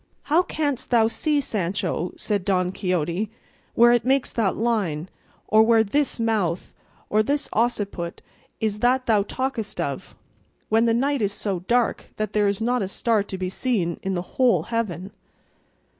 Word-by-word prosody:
"How 315 Hz, +4 st, +3 dB
canst 290 Hz, -7 st, -2 dB
thou 230 Hz, -3 st, +4 dB
see, 295 Hz, +6 st, 0 dB
Sancho," 185 Hz, -, -2 dB
said 205 Hz, -3 st, -1 dB
Don 185 Hz, -1 st, +1 dB
Quixote, 180 Hz, +1 st, -1 dB, 0.5 s
"where 240 Hz, +1 st, +7 dB
it 240 Hz, -1 st, +3 dB
makes 265 Hz, +2 st, +1 dB
that 215 Hz, -5 st, 0 dB
line, 195 Hz, -8 st, -1 dB, 0.4 s
or 215 Hz, +1 st, +5 dB
where 225 Hz, 0 st, +5 dB
this 275 Hz, +5 st, 0 dB
mouth 210 Hz, -7 st, -1 dB, 0.3 s
or 215 Hz, -, +3 dB
this 285 Hz, +6 st, -1 dB
occiput 205 Hz, -7 st, -1 dB, 0.4 s
is 210 Hz, -1 st, -1 dB
that 255 Hz, +2 st, +2 dB
thou 215 Hz, -3 st, +3 dB
talkest 235 Hz, 0 st, -3 dB
of, -, -, -4 dB, 0.5 s
when 225 Hz, +2 st, +4 dB
the 230 Hz, -1 st, +3 dB
night 275 Hz, +2 st, +1 dB
is 200 Hz, -1 st, 0 dB
so 200 Hz, -3 st, -2 dB
dark 235 Hz, +6 st, 0 dB
that 215 Hz, -1 st, -3 dB
there 210 Hz, -1 st, +3 dB
is 200 Hz, -1 st, 0 dB
not 245 Hz, +2 st, +1 dB
a 195 Hz, -, -1 dB
star 220 Hz, +2 st, +1 dB
to 200 Hz, -1 st, -5 dB
be 185 Hz, 0 st, -2 dB
seen 185 Hz, -4 st, -1 dB
in 190 Hz, 0 st, -2 dB
the 175 Hz, -, -2 dB, 0.2 s
whole 250 Hz, -3 st, +4 dB
heaven?" 200 Hz, -4 st, -2 dB
215 Hz, 165 wpm, -24 LUFS, 190-240 Hz, 0.5 s, where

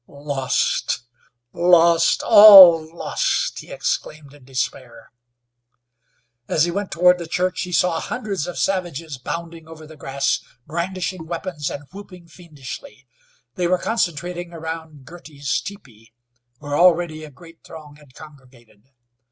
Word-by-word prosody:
"Lost! 140 Hz, -4 st, -2 dB, 0.5 s
Lost! 170 Hz, -1 st, +3 dB
All 190 Hz, -7 st, +9 dB
lost!" -, -, -2 dB
he -, -, -12 dB
exclaimed 155 Hz, -, -4 dB
in 145 Hz, -2 st, -18 dB
despair. 130 Hz, -2 st, -6 dB, 1.4 s
As 155 Hz, -, +1 dB
he 175 Hz, -, 0 dB
went 200 Hz, +2 st, -4 dB
toward 180 Hz, +1 st, +3 dB
the 170 Hz, -, -7 dB
church 180 Hz, +2 st, -2 dB
he 180 Hz, -, -5 dB
saw 175 Hz, 0 st, +1 dB
hundreds 210 Hz, -10 st, -4 dB
of 175 Hz, -, -7 dB
savages 165 Hz, -7 st, -3 dB
bounding 165 Hz, +4 st, -7 dB
over 160 Hz, -1 st, -12 dB
the 155 Hz, +1 st, -14 dB
grass, 140 Hz, -1 st, -2 dB, 0.3 s
brandishing 175 Hz, +1 st, -5 dB
weapons 165 Hz, -3 st, -5 dB
and 145 Hz, -, -7 dB
whooping 185 Hz, -3 st, -13 dB
fiendishly. 140 Hz, -, -11 dB, 0.5 s
They 175 Hz, +5 st, -2 dB
were 185 Hz, +1 st, +2 dB
concentrating 175 Hz, -4 st, -3 dB
around 160 Hz, -3 st, -8 dB
Girty's 150 Hz, -3 st, -5 dB
teepee, 115 Hz, -, -13 dB, 0.4 s
where 145 Hz, +1 st, -5 dB
already 170 Hz, -2 st, +2 dB
a 155 Hz, -, -10 dB
great 165 Hz, +4 st, -18 dB
throng 150 Hz, -2 st, -13 dB
had 145 Hz, -4 st, -21 dB
congregated. 125 Hz, -6 st, -18 dB
165 Hz, 125 wpm, -20 LUFS, 145-180 Hz, 1.4 s, All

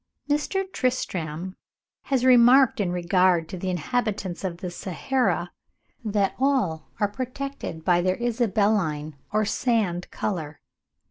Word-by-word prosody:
Mr. 295 Hz, +7 st, 0 dB
Tristram 185 Hz, -, -2 dB, 0.5 s
has 260 Hz, -2 st, +1 dB
remarked 255 Hz, +1 st, +6 dB
in 190 Hz, -4 st, 0 dB
regard 180 Hz, -1 st, +2 dB
to -, -, -7 dB
the 185 Hz, +1 st, -3 dB
inhabitants 190 Hz, -, -2 dB
of 180 Hz, -3 st, -3 dB
the 180 Hz, 0 st, -5 dB
Sahara, 180 Hz, -1 st, -1 dB, 0.5 s
that 205 Hz, -3 st, +1 dB
all 255 Hz, -, +1 dB
are 205 Hz, -, +3 dB
protected 255 Hz, -, -6 dB
by 175 Hz, -1 st, +4 dB
their 185 Hz, +1 st, +1 dB
"isabelline 205 Hz, -10 st, 0 dB, 0.2 s
or 215 Hz, 0 st, +2 dB
sand 205 Hz, -6 st, 0 dB
colour." 160 Hz, -7 st, -4 dB
200 Hz, 120 wpm, -25 LUFS, 175-245 Hz, 0.5 s, remarked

